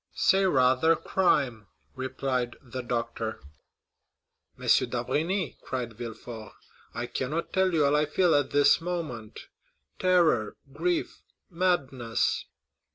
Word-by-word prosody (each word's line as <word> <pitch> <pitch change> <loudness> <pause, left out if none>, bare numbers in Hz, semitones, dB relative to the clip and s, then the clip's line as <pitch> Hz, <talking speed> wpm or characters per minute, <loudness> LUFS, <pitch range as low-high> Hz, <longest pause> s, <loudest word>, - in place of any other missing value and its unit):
"Say, 195 -1 +3
rather, 130 +2 +4
crime!" 135 - +1 0.3
replied 130 -2 -2
the 130 -1 -7
doctor. 115 -2 -3 1.2
"M. - - -8
d'Avrigny," 175 +1 +1
cried 125 -3 -4
Villefort, 115 -1 -8 0.4
"I 120 - -2
cannot 135 +7 -3
tell 190 0 +3
you 155 -4 +3
all 140 +1 +3
I 150 0 +2
feel 175 +3 +2
at 145 -1 +2
this 145 +3 +4
moment,—terror, 155 - -1 0.2
grief, 170 +3 -1 0.3
madness." 140 -10 0
135 Hz, 100 wpm, -28 LUFS, 120-170 Hz, 1.2 s, rather